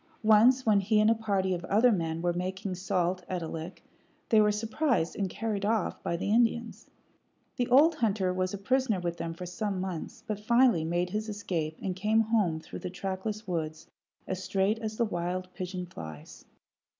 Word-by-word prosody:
Once 230 Hz, +5 st, +5 dB
when 210 Hz, -2 st, +5 dB
he 210 Hz, +2 st, +2 dB
and 215 Hz, +1 st, +5 dB
a -, -, +6 dB
party 200 Hz, -4 st, 0 dB
of 175 Hz, 0 st, -4 dB
other 225 Hz, +7 st, +4 dB
men 165 Hz, -4 st, -1 dB
were 175 Hz, 0 st, +1 dB
making 185 Hz, +2 st, -3 dB
salt 180 Hz, 0 st, -1 dB
at 180 Hz, -2 st, -2 dB
a -, -, -4 dB
lick, 165 Hz, +3 st, -7 dB, 0.5 s
they 220 Hz, -1 st, +6 dB
were 210 Hz, 0 st, +4 dB
surprised 225 Hz, -, 0 dB
and 195 Hz, -2 st, -1 dB
carried 210 Hz, 0 st, -3 dB
off 215 Hz, -1 st, 0 dB
by 170 Hz, -, -2 dB
the 200 Hz, -, -2 dB
Indians. 230 Hz, 0 st, +1 dB, 0.7 s
The 245 Hz, -, 0 dB
old 285 Hz, +7 st, +6 dB
hunter 200 Hz, -8 st, 0 dB
was 185 Hz, 0 st, -1 dB
a 200 Hz, -, -4 dB
prisoner 255 Hz, -1 st, +1 dB
with 170 Hz, -1 st, -3 dB
them 165 Hz, 0 st, -4 dB
for 180 Hz, -, -7 dB
some 195 Hz, +2 st, -3 dB
months, 185 Hz, -3 st, -5 dB
but 210 Hz, -2 st, -3 dB
finally 235 Hz, -5 st, +4 dB
made 175 Hz, +2 st, -1 dB
his 215 Hz, +2 st, -2 dB
escape 170 Hz, -7 st, -3 dB
and 185 Hz, -2 st, -2 dB
came 215 Hz, +4 st, +2 dB
home 210 Hz, -8 st, +1 dB
through -, -, -9 dB
the -, -, -5 dB
trackless 195 Hz, +3 st, -4 dB
woods 160 Hz, -3 st, -3 dB, 0.4 s
as 185 Hz, 0 st, -4 dB
straight 195 Hz, +4 st, +1 dB
as 215 Hz, -1 st, -4 dB
the 235 Hz, -, +2 dB
wild 180 Hz, -1 st, -3 dB
pigeon 180 Hz, 0 st, -5 dB
flies. 80 Hz, -, -10 dB
195 Hz, 190 wpm, -29 LUFS, 180-220 Hz, 0.7 s, a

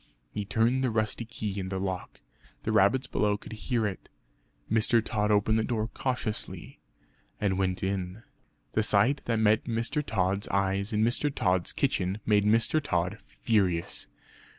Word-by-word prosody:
He 105 Hz, -, -4 dB
turned 115 Hz, +6 st, +2 dB
the 130 Hz, -, +2 dB
rusty 110 Hz, +1 st, -1 dB
key 105 Hz, -3 st, -4 dB
in 95 Hz, -1 st, -4 dB
the 95 Hz, -, -3 dB
lock; 95 Hz, -1 st, -4 dB, 0.4 s
the 110 Hz, -, -1 dB
rabbits 110 Hz, +6 st, +4 dB
below 105 Hz, -1 st, +1 dB
could 110 Hz, -, -10 dB
hear 115 Hz, +1 st, -1 dB
it. 95 Hz, -4 st, -5 dB, 0.6 s
Mr. 115 Hz, +2 st, +3 dB
Tod 105 Hz, -2 st, 0 dB
opened 105 Hz, +1 st, +3 dB
the -, -, +1 dB
door 110 Hz, -2 st, -1 dB
cautiously 125 Hz, -4 st, -3 dB, 0.6 s
and 95 Hz, -2 st, 0 dB
went 95 Hz, -1 st, 0 dB
in. 95 Hz, +2 st, -3 dB, 0.5 s
The 110 Hz, -, +1 dB
sight 120 Hz, +7 st, +3 dB
that 115 Hz, -1 st, 0 dB
met 110 Hz, +1 st, +3 dB
Mr. 115 Hz, +6 st, 0 dB
Tod's 100 Hz, -3 st, 0 dB
eyes 100 Hz, +2 st, 0 dB
in 110 Hz, 0 st, +2 dB
Mr. 125 Hz, +6 st, +1 dB
Tod's 90 Hz, -8 st, +1 dB
kitchen 95 Hz, +2 st, 0 dB
made 105 Hz, -1 st, +3 dB
Mr. 115 Hz, +8 st, +3 dB
Tod 90 Hz, -, -1 dB
furious. 95 Hz, -7 st, 0 dB
105 Hz, 155 wpm, -28 LUFS, 95-115 Hz, 0.6 s, rabbits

